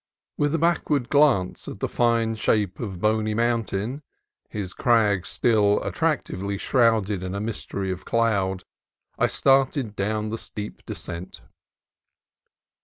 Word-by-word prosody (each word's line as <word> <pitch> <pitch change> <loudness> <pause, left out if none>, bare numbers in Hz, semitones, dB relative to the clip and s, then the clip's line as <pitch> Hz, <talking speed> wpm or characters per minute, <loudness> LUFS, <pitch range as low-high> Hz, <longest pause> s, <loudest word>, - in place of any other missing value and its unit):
With 145 +1 +1
a - - +2
backward 160 -5 +1
glance 140 -11 +3
at - - -7
the - - -1
fine 115 -2 +1
shape 105 -3 0
of 95 -7 -5
Boney 110 +1 +1
Mountain, 115 +2 -1 0.5
his 95 -3 -5
crags 105 -6 +2
still 105 -3 +3
attractively 100 +2 -1
shrouded 110 -5 +2
in 95 +1 -4
a - - -2
mystery 100 -3 -4
of 95 0 -5
cloud, 100 -5 0 0.6
I - - +4
started 135 -4 +2
down 105 +2 -1
the 115 +1 -4
steep 105 0 -7
descent. 85 +2 -7
110 Hz, 125 wpm, -24 LUFS, 100-120 Hz, 0.6 s, I